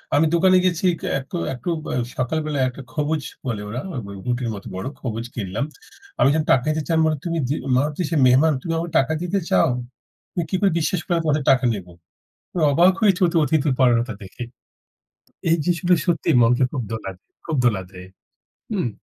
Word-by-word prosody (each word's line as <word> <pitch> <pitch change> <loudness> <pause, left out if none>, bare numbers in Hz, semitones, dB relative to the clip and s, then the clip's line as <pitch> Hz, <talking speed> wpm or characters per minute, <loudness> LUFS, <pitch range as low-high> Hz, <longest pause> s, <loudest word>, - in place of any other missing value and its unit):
আমি 150 - +4
দোকানে 185 +2 +5
গেছি 180 -1 0
এক 165 - -8 0.6
একটু, 125 +8 -5
ব্য - - -7 0.3
সকাল 130 +5 -1
বেলায় 145 -4 0
একটা 130 +2 -10
খবুজ 150 +1 -1 0.2
বলে 115 -5 -2
ওরা, 120 +4 -4 0.4
রুটির 125 -1 -1
মত 100 - -9
বড় 95 +4 -4
খবুজ 115 -2 -4
কিনলাম। 105 +4 -2 0.5
আমি - - +5
যখন 155 0 +1
টাকা 125 - +3
দিতে 155 +1 +1
যাই 165 -1 +3
বলে, 155 -1 +1
"তুমি 170 -1 -1
যে, 145 - +1 0.2
মারুতি 150 +6 0
সে 165 - -1
মেহমান, 140 +6 +5
তুমি 165 - -3
আমাকে 170 +1 -3
টাকা 135 +4 +1
দিতে 180 +3 0
চাও? 90 -1 +4 0.6
তুমি 175 - -2
কি - - -1
করে 200 -2 +4
বিশ্বাস 170 +2 0
করো - - -1
আমি 165 - 0
তোমাদের 150 -2 +1
টাকা 130 -1 +3
নেব?" 100 -4 -6 0.7
আমি 175 - -1
অবাক 175 +6 +5
হয়েছি 200 -4 +3
ওদের 170 0 +1
অতিথি 150 0 +1
পরায়ণতা 120 -2 +3
দেখে। 95 +5 -9 1.1
এই 165 - +5
দৃশ্যটা 175 +2 +2
সত্যি 175 -3 0
মনকে 120 +3 +4
খুব 135 - -2
দোলা 105 -4 -4
দেয়, 90 - -49
খুব 160 - -1
দোলা 105 -6 +2
দেয়। 90 -1 -11 0.7
হুম। 190 - 0
150 Hz, 190 wpm, -22 LUFS, 120-170 Hz, 1.1 s, দোকানে